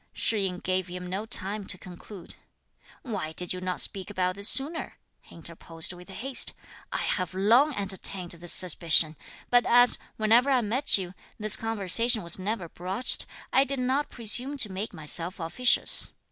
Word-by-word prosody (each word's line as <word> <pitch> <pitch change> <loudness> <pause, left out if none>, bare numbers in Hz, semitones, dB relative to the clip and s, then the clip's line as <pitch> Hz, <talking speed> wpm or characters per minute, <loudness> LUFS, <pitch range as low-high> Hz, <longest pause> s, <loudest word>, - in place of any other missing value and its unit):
Shih 210 -3 0
yin 180 -1 -5
gave 185 0 -3
him 180 0 -8
no 190 +5 -6
time 205 -2 -2
to 185 - 0
conclude. 180 +1 -12 0.7
"Why 200 - -6
did 180 +2 -2
you 180 - -8
not 185 0 -3
speak 195 0 +1
about 185 -2 -2
this 200 +3 +2
sooner?" 295 +5 0 0.2
he - - -19
interposed 165 0 -2
with 180 +2 -15
haste. 250 +7 -3 0.4
"I - - -4
have 185 -1 -3
long 240 +10 +2
entertained 195 -2 -2
this 170 0 -4
suspicion; 165 -3 +6 0.4
but 245 0 +4
as, 245 +1 +4 0.2
whenever 230 +5 +2
I 260 -3 +2
met 235 +5 0
you, 185 -2 -7 0.3
this 215 -1 +2
conversation 225 +1 -1
was 170 +2 +2
never 195 -2 -5
broached, 185 +9 -1 0.3
I 270 - +4
did 275 0 -2
not 265 +3 -2
presume 245 +5 0
to 215 -7 +1
make 195 +4 -6
myself 170 +3 0
officious. 175 +10 +5
195 Hz, 165 wpm, -26 LUFS, 180-235 Hz, 0.7 s, suspicion